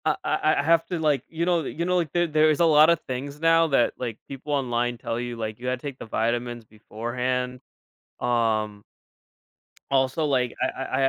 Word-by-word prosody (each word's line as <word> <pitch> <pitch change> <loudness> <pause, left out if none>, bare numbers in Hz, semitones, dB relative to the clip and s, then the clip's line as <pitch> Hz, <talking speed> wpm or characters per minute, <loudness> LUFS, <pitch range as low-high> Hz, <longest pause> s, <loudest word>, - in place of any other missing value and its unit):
I - - +2
I - - +1
I - - +1
have 165 +1 +3
to, 175 -1 -3
like, 150 -3 +1
you 165 +1 -2
know 175 -2 +2
the - - -4
you 170 +2 -3
know, 180 +1 +1
like 165 -5 -1
there 175 0 +2
there's 155 -1 +3
a 170 - +5
lotta 155 +1 +6
things 140 0 -6
now 165 0 +4
that, 135 -5 +2
like, 115 -3 -4
people 140 +2 -6
online 120 -3 0
tell 115 0 -3
you, 120 0 -4
like, 110 -1 -5
you 125 - -6
had 130 -1 -1
to 145 - -7
take 135 -2 -7
the - - -7
vitamins 120 +1 -2
beforehand. 125 +4 -3 0.6
Um 110 -4 0 1.1
also, 135 +3 +2
like, 130 -4 0
I 130 - +3 0.2
I 130 0 -2
130 Hz, 200 wpm, -25 LUFS, 120-155 Hz, 1.1 s, lotta